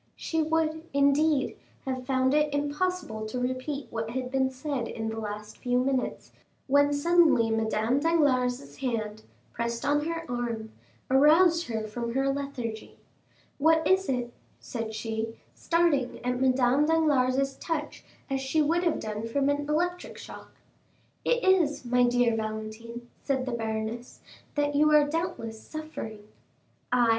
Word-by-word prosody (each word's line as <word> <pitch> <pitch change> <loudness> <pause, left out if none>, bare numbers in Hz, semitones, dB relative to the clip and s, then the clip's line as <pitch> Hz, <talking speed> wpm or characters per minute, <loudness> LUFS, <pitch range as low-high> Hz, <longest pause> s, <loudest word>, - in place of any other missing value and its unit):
She 320 -1 -1
would, 315 0 0
indeed, 280 0 +3 0.3
have 255 -1 -4
found 260 0 +2
it 300 0 +3
impossible 290 -6 -2
to 250 +3 -4
repeat 255 +3 -3
what 225 -1 -3
had 255 +1 -4
been 265 -1 +2
said 260 -1 -3
the 225 0 -4
last 210 0 -6
few 245 -1 0
minutes, 260 0 -1 0.3
when 285 +1 +4
suddenly 295 -6 +4
Madame 225 +3 +1
Danglars' 280 -5 +1
hand, 220 -5 -3 0.3
pressed 235 +1 -3
on 295 +1 +2
her 330 0 -3
arm, 235 -3 -3 0.4
aroused 325 +5 +5
her 220 -2 -2
from 235 +2 -4
her 270 0 +2
lethargy. 260 -6 -5 0.6
"What 320 +2 +4
is 380 +1 +3
it?" 245 -2 -1 0.3
said 225 -2 -5
she, 225 0 -3 0.2
starting 330 -7 +1
at 250 0 -1
Madame 260 +2 +3
Danglars' 275 -4 +2
touch 315 -3 -4 0.2
as 270 -1 -1
she 270 +4 0
would 330 +4 +2
have 335 -3 +1
done 215 +1 -4
from 275 +4 +1
an 290 0 -1
electric 355 +4 -1
shock. - - -11 0.7
"It 485 0 +1
is, 345 -8 +3
my 245 0 +3
dear 245 -1 +3
Valentine," 220 +2 -5
said 265 -2 -1
the 255 - -3
baroness, 225 +1 -4 0.3
"that 290 0 +1
you 300 +1 +4
are, 300 -1 +6
doubtless, 290 -9 -3
suffering." 310 -9 -7 0.7
40280m - - -1
"I?" 240 -2 +4
265 Hz, 145 wpm, -28 LUFS, 235-300 Hz, 0.7 s, are